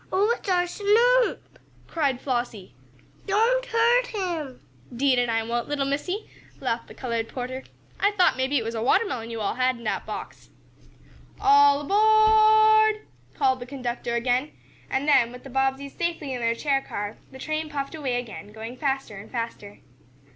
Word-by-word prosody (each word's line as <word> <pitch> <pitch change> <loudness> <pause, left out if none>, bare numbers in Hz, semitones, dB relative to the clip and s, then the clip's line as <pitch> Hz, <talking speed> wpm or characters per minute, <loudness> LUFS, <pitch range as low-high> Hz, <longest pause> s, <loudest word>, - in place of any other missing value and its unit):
"Oh, 410 +5 +3
it's - - -8
our 355 -1 +3
Snoop!" 465 +7 +2 0.3
cried 280 -6 -1
Flossie. 240 -7 -3 0.5
"Don't 465 +5 +2
hurt 470 +2 +3
him!" 340 - -4 0.3
"'Deed 260 0 +2
an' 245 -1 0
I 225 0 0
won't, 235 +2 -3
little 285 -2 -1
Missie!" 325 +9 -3 0.3
laughed - - -2
the - - -13
colored 230 -3 -3
porter. 255 +1 -5 0.4
"I 405 - +4
thought 370 -3 +3
maybe 260 +2 0
it 235 - 0
was 225 +1 -4
a 225 - -3
watermelon 255 - +1
yo' 230 -1 -5
all 200 - -1
had 255 0 +1
in 235 - -13
dat 215 - -3
box." - - -8 0.9
"All 285 0 +5
aboard!" 435 +3 +5 0.3
called 260 -3 +2
the 245 - -8
conductor 245 -3 -4
again, 250 +4 0 0.4
and 270 +2 -1
then, 250 -5 +4
with 250 0 -11
the 270 - -11
Bobbseys 270 +1 -1
safely 330 -5 -3
in 250 - -4
their 230 0 +1
chair 275 +2 0
car, 205 -4 -6
the 265 - -11
train 310 +3 -3
puffed 280 -1 -4
away 280 -6 -2
again, 215 -6 -6
going 225 +3 -8
faster 270 -6 -2
and 200 +2 -11
faster. 230 -4 -6
275 Hz, 170 wpm, -25 LUFS, 240-370 Hz, 0.9 s, All